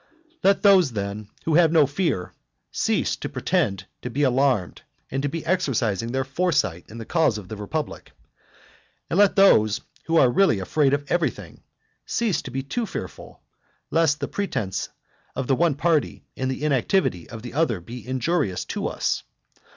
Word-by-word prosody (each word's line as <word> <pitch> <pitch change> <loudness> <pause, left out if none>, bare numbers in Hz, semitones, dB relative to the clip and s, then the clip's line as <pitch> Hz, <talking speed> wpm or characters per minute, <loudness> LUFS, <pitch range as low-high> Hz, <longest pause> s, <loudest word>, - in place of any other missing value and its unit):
IX. 330 - -34
Let 195 0 +3
those, 185 - +5
then, 100 0 -4 0.2
who 160 - +1
have 165 0 +5
no 160 -3 +5
fear, 140 - -2 0.4
cease - - 0
to - - -5
pretend 95 -1 -1 0.2
to 125 - -4
be 140 +5 -1
alarmed, 130 -7 +1 0.3
and 135 - -1
to 145 - -1
be 165 +2 -5
exercising 120 - 0
their 135 +1 0
foresight 135 - 0
in 115 - -10
the 115 - -7
cause 160 -8 +2
of 95 -3 -9
the 110 - -5
republic. 145 +10 -5 1.0
And 180 - +2
let 205 -2 +5
those 110 - +5 0.3
who 165 0 +3
really 125 - +3
are - - -4
afraid 140 +6 +2
of 145 0 -5
everything, 175 -2 -2 0.5
cease 225 -6 0
to - - -8
be 135 +1 -3
too 225 - -3
fearful, - - -8 0.5
lest 160 -3 +2
the - - -1
pretence 110 - -3 0.5
of 130 - -2
the 135 - +2
one 165 -1 +2
party 155 0 0
and 130 0 -2
the 130 +2 -4
inactivity 135 - +1
of 115 -1 -9
the 120 - -8
other 145 - +1
be 115 +6 -10
injurious 130 - -1
to - - -2
us. - - -1
135 Hz, 175 wpm, -24 LUFS, 115-165 Hz, 1.0 s, those